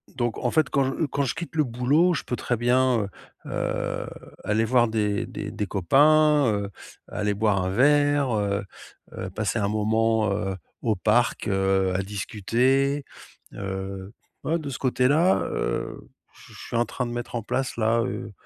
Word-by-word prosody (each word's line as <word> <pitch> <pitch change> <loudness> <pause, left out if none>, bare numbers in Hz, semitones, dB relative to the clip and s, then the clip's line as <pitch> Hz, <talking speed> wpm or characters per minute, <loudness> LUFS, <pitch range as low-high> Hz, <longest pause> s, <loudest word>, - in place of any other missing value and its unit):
donc 120 -2 -1
en 120 - 0
fait, 155 +2 +2
quand 140 -1 +2
je 135 +5 -1
quand 140 0 -1
je 135 - -2
quitte 170 0 -7
le 155 - +3
boulot, 140 +8 +2
je - - -3
peux 125 - -3
très 120 0 -2
bien, 125 0 +3 0.4
heu, - - -8
heu, - - -2 0.4
aller 110 +2 +1
voir 120 0 +3
des 105 -2 -1
des - - -6
des 105 - -3
copains, 145 - +4
heu, 100 -1 -2 0.4
aller 105 -1 -2
boire 100 -2 +2
un 90 - -1
verre, 145 +4 +3
heu, 100 -1 0 0.5
heu, 95 - -5
passer 105 +3 -2
un 100 - +1
moment, 110 0 +1
heu, 95 -1 -2 0.3
au 110 -3 +1
parc, 110 +6 +1
heu, 95 -1 +1
à 95 - +1
discuter, 125 +8 0 0.5
heu, 95 0 -5 0.3
ouais, 165 +2 +1
de 150 - -6
ce 135 - -5
côté-là, 140 +7 +3
heu, - - -2 0.4
je - - -17
je - - -13
suis 120 - -3
en 120 - +3
train 125 - -4
de 120 - -5
mettre 120 0 -5
en 115 - -2
place 130 +4 -2
là, 115 +1 +2
heu, 115 -2 -4
115 Hz, 180 wpm, -25 LUFS, 105-135 Hz, 0.5 s, copains